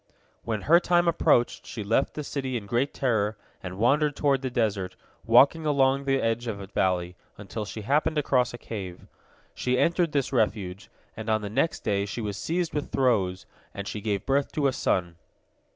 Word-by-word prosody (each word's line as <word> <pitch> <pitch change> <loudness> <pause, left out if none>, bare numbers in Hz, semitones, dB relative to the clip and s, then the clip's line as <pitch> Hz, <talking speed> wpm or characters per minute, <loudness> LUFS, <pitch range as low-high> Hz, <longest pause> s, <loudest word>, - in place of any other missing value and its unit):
When 110 -4 -3
her 170 +4 +6
time 175 -1 +2
approached, 140 -7 +2
she 110 - -5
left 115 +7 +1
the 150 - -4
city 135 -3 -3
in 105 - -7
great 120 +7 0
terror 110 -5 0 0.2
and 95 0 -7
wandered 145 +6 +2
toward 140 -3 +1
the 130 - -2
desert, 105 -6 -1 0.3
walking 140 +8 +6
along 140 -2 +2
the 135 -1 +2
edge 115 +1 -1
of 105 -3 -3
a 100 - -7
valley, 90 -2 -1 0.2
until 105 +2 -6
she 110 +1 -7
happened 150 +7 +1
across 130 -4 +2
a 120 - -7
cave. 95 -6 -7 0.5
She 125 0 0
entered 170 +1 +2
this 140 -2 -1
refuge, 105 -5 -1 0.3
and 110 0 -6
on 110 -1 +1
the 100 - -5
next 165 +9 0
day 100 -1 0
she 100 - -5
was 105 -3 -3
seized 170 - -2
with 150 -1 -3
throes, 105 -9 +1 0.3
and 100 0 -5
she 105 - -5
gave 100 -2 -2
birth 140 +1 +1
to 150 - 0
a 135 - +3
son. 85 -7 -1
120 Hz, 190 wpm, -26 LUFS, 100-140 Hz, 0.5 s, her